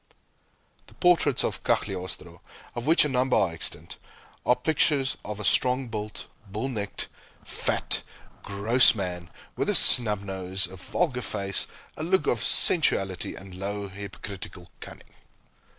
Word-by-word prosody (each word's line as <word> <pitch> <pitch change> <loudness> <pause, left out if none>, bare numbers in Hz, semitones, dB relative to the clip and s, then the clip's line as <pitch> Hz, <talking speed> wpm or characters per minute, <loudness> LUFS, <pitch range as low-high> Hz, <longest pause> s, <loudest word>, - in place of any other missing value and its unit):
The - - -18
portraits 170 -6 +3
of - - -3
Cagliostro, 90 -2 -3 0.3
of 120 +3 -5
which 165 0 +5
a - - +1
number 130 -1 +1
are 95 - +2
extant, 80 - -5 0.5
are 125 - +5
pictures 145 -3 +1
of 105 0 -6
a 105 - -5
strong 125 0 +2
built, 105 -1 -5 0.2
bull 110 +7 -4
necked, 105 -5 -4 0.4
fat, - - 0 0.4
gross 110 +6 +4
man, 90 -4 -5 0.3
with - - -1
a - - +1
snub 105 -5 +4
nose, 95 -1 -3
a 95 - -11
vulgar 125 - -2
face, 100 -4 -2 0.3
a - - -8
look 190 +4 +1
of - - 0
sensuality 95 - +4
and 95 -1 -11
low 100 +2 -5
hypocritical 95 -3 -9
cunning. - - -12
105 Hz, 135 wpm, -26 LUFS, 95-125 Hz, 0.5 s, which